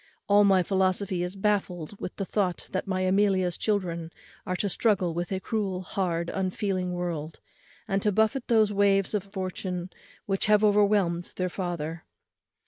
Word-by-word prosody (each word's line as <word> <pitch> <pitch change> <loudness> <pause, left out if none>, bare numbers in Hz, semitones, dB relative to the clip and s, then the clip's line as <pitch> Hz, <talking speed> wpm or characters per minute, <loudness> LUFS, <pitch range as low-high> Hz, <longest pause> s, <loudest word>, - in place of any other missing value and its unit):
All 205 0 +6
my 190 -2 +5
philosophy 190 0 +1
is 180 +2 -2
baffled 195 -3 -1
with - - -5
the 195 - -3
thought 185 -3 -1
that 185 - -2
my 185 -1 -1
Amelia's 185 -2 +2
children 175 -6 -1 0.4
are 185 - -1
to 200 - -1
struggle 195 -3 +1
with 175 +2 -3
a 190 - -1
cruel, 195 -3 -2
hard, 175 -3 -2
unfeeling 185 -1 -1
world, 165 -3 -4 0.5
and 195 0 0
to 210 - +2
buffet 220 +5 +1
those 215 -3 +3
waves 195 -1 +3
of 205 -2 -1
fortune 185 -2 -4 0.3
which 195 +1 0
have 210 0 +4
overwhelmed 200 -4 +3
their 185 0 -1
father. 170 -3 -4
190 Hz, 155 wpm, -27 LUFS, 180-205 Hz, 0.5 s, All